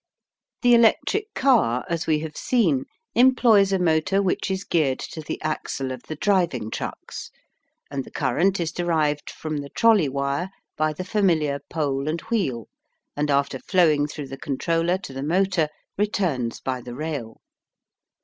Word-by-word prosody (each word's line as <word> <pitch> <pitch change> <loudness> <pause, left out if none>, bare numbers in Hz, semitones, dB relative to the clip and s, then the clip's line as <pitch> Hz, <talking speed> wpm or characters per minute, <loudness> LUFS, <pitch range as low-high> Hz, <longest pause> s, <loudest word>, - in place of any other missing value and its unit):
The 245 0 +6
electric 240 - +3
car, 225 - +3
as 170 -2 -2
we 155 -1 +2
have 155 -2 -6
seen, 170 - +1 0.3
employs 235 -6 +5
a 195 - +3
motor 180 +2 +2
which 195 -1 0
is 190 0 -2
geared 150 -8 +1
to 160 - -6
the 150 - -5
axle 140 -3 -3
of 130 -1 -6
the 155 - -4
driving 160 - +1
trucks, - - -6 0.6
and 140 -1 -2
the - - -13
current 185 +10 +1
is 165 -2 -1
derived 155 -4 0
from 155 -1 -5
the 140 -1 -5
trolley 215 -8 +4
wire 140 +6 -2 0.3
by 155 0 +1
the 180 +5 -6
familiar 165 -8 +1
pole 145 -2 -1
and 165 +2 -2
wheel 135 - -1 0.5
and 150 0 -1
after 140 -1 +1
flowing 155 -5 +3
through 145 -2 -7
the 135 - -7
controller 165 +5 0
to 185 -8 -9
the 135 - -5
motor 175 +1 +1 0.3
returns 175 - 0
by 130 -1 -3
the 120 0 -8
rail. 140 -6 -5
155 Hz, 160 wpm, -24 LUFS, 140-190 Hz, 0.6 s, The